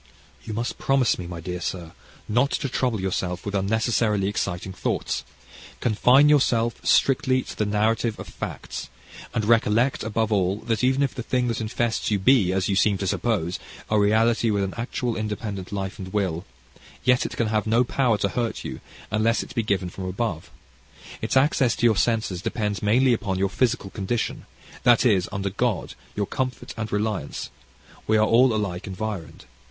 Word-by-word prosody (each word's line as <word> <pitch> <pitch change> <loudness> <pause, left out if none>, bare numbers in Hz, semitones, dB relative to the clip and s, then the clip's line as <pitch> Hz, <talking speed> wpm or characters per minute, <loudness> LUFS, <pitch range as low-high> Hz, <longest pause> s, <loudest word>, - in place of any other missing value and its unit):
"You 110 - -5
must 120 +2 -3
promise 135 -6 +2
me, 90 - -5
my 85 -1 -6
dear 90 +1 -5
sir, 85 -3 -4 0.4
not 125 +6 +2
to 140 - -1
trouble 125 -3 0
yourself 90 -1 -2
with 100 - -3
unnecessarily 105 0 +1
exciting 95 -2 -3
thoughts; 90 - -2 0.6
confine 125 +6 +5
yourself 120 -6 +2
strictly 130 -1 +3
to - - -9
the 105 - -1
narrative 110 +2 +1
of - - -7
facts; - - -6 0.4
and 110 - -1
recollect, 115 +3 +3
above 110 0 -1
all, 95 -1 +2
that 115 0 -1
even 130 +2 +3
if 135 - 0
the 125 - -5
thing 125 +1 0
that 115 - -2
infests 115 +1 -1
you 105 - +2
be, 100 -2 +4
you 95 - +1 0.2
seem 100 0 +3
to 100 - -3
suppose 95 -3 -1 0.3
a 110 - +4
reality 110 +3 +3
with 100 -2 +1
an 95 - -3
actual 120 0 -2
independent 105 -3 -4
life 100 0 -4
and 95 -1 -7
will, 95 -4 -1 0.6
yet 125 0 +4
it - - -5
can 115 -2 +1
have 110 0 0
no 115 +3 +4
power 125 -3 +1
to 100 0 0
hurt 120 0 -2
you, - - -6 0.3
unless 110 +2 +2
it - - -11
be 120 - +1
given 100 -4 0
from 95 - -6
above: 95 -3 -3 0.7
its - - 0
access 130 -3 +3
to - - 0
your 115 -2 +5
senses 110 -5 0
depends 105 -2 -2
mainly 120 +5 +4
upon 105 -5 -1
your 95 +1 +1
physical 110 -3 0
condition 110 +3 -3 0.3
this 120 +2 +5
is, 100 -7 +3
under 100 -1 -2
God, 110 -2 -1 0.2
your 105 - 0
comfort 130 +4 -3
and 110 -1 -4
reliance: 105 0 -2 0.6
we 110 - +4
are 110 - +4
all 125 +3 +5
alike 100 -5 -2
environed. 100 -3 -5
110 Hz, 180 wpm, -24 LUFS, 100-120 Hz, 0.7 s, confine